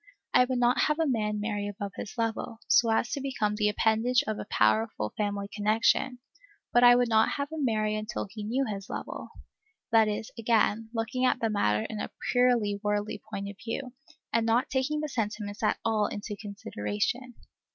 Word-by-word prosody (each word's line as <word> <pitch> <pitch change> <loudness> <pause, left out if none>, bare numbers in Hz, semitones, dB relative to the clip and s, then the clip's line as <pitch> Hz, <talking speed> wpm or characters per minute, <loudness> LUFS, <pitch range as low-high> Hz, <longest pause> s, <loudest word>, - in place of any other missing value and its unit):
I 250 - +6
would 255 0 -1
not 245 0 +3
have 300 - +1
a 325 - +3
man 210 -6 0
marry 205 -1 -2
above 200 0 -5
his 215 - -7
level, 225 0 -2
so 230 - +5
as 225 +2 +1
to 280 - -2
become 235 -6 -1
the 210 0 +2
appendage 225 +3 +2
of 215 -1 -3
a - - -6
powerful 110 0 +1
family 205 -1 -2
connection; 220 +4 +2 0.6
but 240 - +5
I 245 0 +9
would 245 0 +3
not 220 -1 +3
have 280 +1 -3
him 315 -2 -3
marry 215 -3 +1
until 215 0 -3
he 210 +2 -8
knew 250 +6 0
his 200 -4 -5
level, - - -6 0.6
that 225 -1 +5
is, 210 +1 -3
again, 225 -1 +2
looking 235 +2 -2
at 255 - +3
the 225 -1 0
matter 105 - +1
in 215 - -5
a - - -3 0.2
purely 240 -5 +3
worldly 210 0 -1
point 200 -1 -4
of 200 -1 -8
view, 245 +2 -4 0.4
and 230 - +3
not 230 +5 +1
taking 275 +3 0
the 305 - -2
sentiments 210 -5 -3
at - - +2
all 215 -2 +2
into 205 0 -5
consideration. 200 - -3
220 Hz, 190 wpm, -28 LUFS, 205-245 Hz, 0.6 s, I